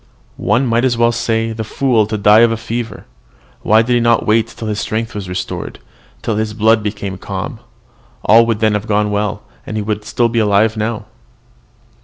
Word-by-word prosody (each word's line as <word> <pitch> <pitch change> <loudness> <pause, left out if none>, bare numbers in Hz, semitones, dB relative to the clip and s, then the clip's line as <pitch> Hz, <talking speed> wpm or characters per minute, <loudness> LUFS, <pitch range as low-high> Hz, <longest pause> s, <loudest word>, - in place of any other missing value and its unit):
One 125 +2 +2
might 115 0 +1
as 125 -3 +1
well 120 0 +3
say, 115 -1 -1
'The 110 0 -4
fool, 115 -1 +1
to 110 0 -2
die 105 +1 +5
of 115 0 +5
a 115 - -1
fever! 115 -1 -5 0.6
why 110 +2 +4
did 125 +2 0
he 120 - +3
not 115 -1 +2
wait 110 +1 +2
till 115 - -8
his 105 -1 -2
strength 110 +1 -3
was 100 -3 -6
restored, 90 +1 -5 0.5
till 110 -2 -1
his 110 -1 -2
blood 110 0 +3
became 100 -2 -5
calm? - - -5 0.7
all 115 +2 +6
would 115 -1 -1
then 110 -1 +3
have 105 +1 -2
gone 105 0 +1
well, 105 0 -2 0.2
and 110 - -5
he 105 - -1
would 105 0 -3
have 120 -1 +2
been 115 -1 +1
alive 105 +1 +2
now.'" 110 0 -3
110 Hz, 200 wpm, -16 LUFS, 105-115 Hz, 0.7 s, all